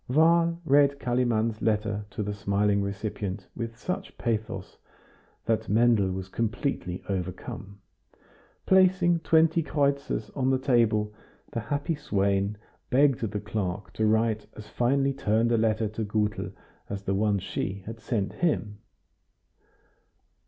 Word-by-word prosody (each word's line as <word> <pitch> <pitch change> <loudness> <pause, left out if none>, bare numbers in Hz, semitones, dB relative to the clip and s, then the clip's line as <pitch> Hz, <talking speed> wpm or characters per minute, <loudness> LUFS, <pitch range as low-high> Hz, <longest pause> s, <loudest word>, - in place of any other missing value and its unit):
Wahl 165 +4 +4
read 140 -1 +4
Kalimann's 115 -3 0
letter 105 -1 0
to 105 - -4
the 105 0 -3
smiling 100 0 +1
recipient 100 -1 -4
with 115 0 -5
such 180 - -5
pathos 110 -5 -3 0.7
that 110 -4 0
Mendel 110 -2 +4
was 95 0 -4
completely 110 - -2
overcome. 95 +1 -5 0.9
Placing 185 -2 +4
twenty 160 0 +4
kreutzers 140 -2 -1
on 130 -1 +1
the 130 - +3
table, 115 -5 +2 0.4
the - - -2
happy 145 +8 -2
swain 100 -8 0 0.3
begged 135 -1 +4
the 105 -2 -2
clerk 100 -3 -4
to 110 - +1
write 110 0 +1
as 105 -1 -9
finely 135 +3 +1
turned 115 -1 +1
a 115 - +4
letter 110 0 +1
to 110 +1 -4
Gutel 105 0 -1 0.4
as 100 -1 -4
the 95 - -1
one 100 +1 +2
she 95 0 -4
had 115 +1 -7
sent 105 -4 -2
him. 110 -11 -1
110 Hz, 130 wpm, -27 LUFS, 100-135 Hz, 0.9 s, Wahl